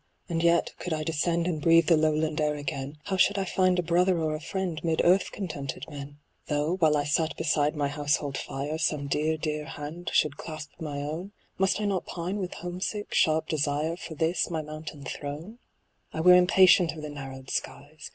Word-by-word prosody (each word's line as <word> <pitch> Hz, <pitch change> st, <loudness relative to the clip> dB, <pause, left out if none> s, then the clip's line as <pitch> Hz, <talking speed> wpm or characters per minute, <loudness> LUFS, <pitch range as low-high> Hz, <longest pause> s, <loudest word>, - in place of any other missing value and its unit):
And 165 Hz, -2 st, -1 dB
yet, 170 Hz, 0 st, +3 dB
could 180 Hz, -, -3 dB
I 155 Hz, -1 st, -2 dB
descend 165 Hz, +2 st, 0 dB
And 165 Hz, -4 st, -1 dB
breathe 165 Hz, +1 st, +5 dB
the 165 Hz, -, +5 dB
lowland 155 Hz, 0 st, +1 dB
air 150 Hz, 0 st, +1 dB
again, 145 Hz, 0 st, -5 dB
How 190 Hz, -, -2 dB
should 200 Hz, +2 st, +4 dB
I 195 Hz, -, 0 dB
find 185 Hz, -1 st, +2 dB
a 180 Hz, -, +1 dB
brother 175 Hz, +2 st, +3 dB
or 160 Hz, -2 st, 0 dB
a 155 Hz, -, -3 dB
friend 180 Hz, -2 st, -3 dB
'Mid 165 Hz, -1 st, 0 dB
earth 185 Hz, +3 st, +4 dB
contented 150 Hz, -8 st, -5 dB
men? 145 Hz, -1 st, -8 dB, 0.3 s
Though, 150 Hz, +4 st, 0 dB
while 155 Hz, -4 st, +4 dB
I 145 Hz, -, +1 dB
sat 155 Hz, +2 st, 0 dB
beside 150 Hz, 0 st, +1 dB
my 145 Hz, -1 st, 0 dB
household 145 Hz, -1 st, -1 dB
fire, 145 Hz, +4 st, -4 dB
Some 150 Hz, -3 st, 0 dB
dear, 155 Hz, +3 st, 0 dB
dear 150 Hz, -1 st, -3 dB
hand 155 Hz, +4 st, -6 dB
should 150 Hz, -1 st, +2 dB
clasp 155 Hz, -3 st, -7 dB
my 150 Hz, -3 st, -4 dB
own. 165 Hz, +7 st, -5 dB, 0.3 s
Must 190 Hz, +2 st, +2 dB
I 210 Hz, -, -1 dB
not 195 Hz, -3 st, -1 dB
pine 180 Hz, +3 st, -3 dB
with 185 Hz, -3 st, -4 dB
home 175 Hz, +1 st, -6 dB
sick, 205 Hz, +1 st, -3 dB
sharp 155 Hz, 0 st, +3 dB
desire 150 Hz, +1 st, 0 dB
For 170 Hz, -2 st, -8 dB
this 160 Hz, +4 st, +1 dB
my 160 Hz, -2 st, -2 dB
mountain 155 Hz, -1 st, -8 dB
throne? 155 Hz, +11 st, -6 dB, 0.5 s
I -, -, -5 dB
were 180 Hz, +2 st, +8 dB
impatient 180 Hz, -1 st, +6 dB
of 155 Hz, -1 st, -9 dB
the 150 Hz, -, -5 dB
narrowed 135 Hz, -2 st, -8 dB
skies. 145 Hz, +2 st, -5 dB
155 Hz, 200 wpm, -27 LUFS, 150-175 Hz, 0.5 s, were